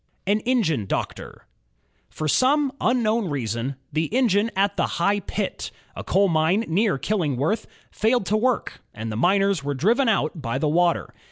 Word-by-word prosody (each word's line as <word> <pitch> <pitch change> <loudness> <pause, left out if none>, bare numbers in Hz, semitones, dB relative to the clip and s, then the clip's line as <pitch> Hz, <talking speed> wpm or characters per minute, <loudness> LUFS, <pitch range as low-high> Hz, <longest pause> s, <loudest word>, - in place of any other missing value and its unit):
An 205 +3 +2
Engine 165 - +1
Doctor - - -5 0.6
For 155 - -4
some 275 - +3
unknown 230 -4 +1
reason, 125 -1 -3 0.2
the 160 +1 +1
engine 225 -3 +2
at 200 +1 +1
the - - +1
High 200 +4 +2
Pit, 200 +1 -4 0.3
a - - -6
coal 200 +1 +2
mine 165 +6 +2
near 190 0 +1
Killingworth, 160 - -1 0.2
failed 225 0 +1
to 210 - 0
work, 245 +3 -1
and 110 0 -5
the - - -4
miners 195 - +2
were 145 0 -2
driven 230 - +2
out 160 -6 0
by 125 0 -2
the 150 - 0
water. 170 +3 +1
195 Hz, 160 wpm, -23 LUFS, 155-220 Hz, 0.6 s, some